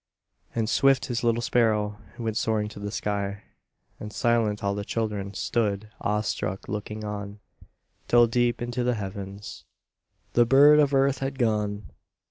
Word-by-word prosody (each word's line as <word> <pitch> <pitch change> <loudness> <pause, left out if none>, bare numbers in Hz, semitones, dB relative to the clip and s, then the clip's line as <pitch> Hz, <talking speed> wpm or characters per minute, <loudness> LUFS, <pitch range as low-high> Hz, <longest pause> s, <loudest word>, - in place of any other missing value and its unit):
And 115 -2 0
swift, 135 +2 +3
His 120 -1 -3
little 120 0 +1
sparrow 105 -3 +1 0.2
Went 110 -2 -3
soaring 110 -2 0
to 105 - -10
the 105 0 -4
sky, 100 -1 -3 0.6
And 105 - -7
silent, 115 -5 +1
all 100 0 +1
the 100 0 -3
children 105 -3 -3
Stood, 105 -2 -1
awestruck, 105 -2 -2
looking 105 +1 -5
on, 105 -1 -6 0.7
Till, 120 0 +6
deep 120 0 +1
into 120 +1 -2
the 125 0 +1
heavens, 100 0 -7 0.7
The 120 -1 +4
bird 145 +4 +7
of 145 -2 +3
earth 135 0 +3
had 135 0 -3
gone. 105 -5 -1
110 Hz, 145 wpm, -26 LUFS, 105-120 Hz, 0.7 s, bird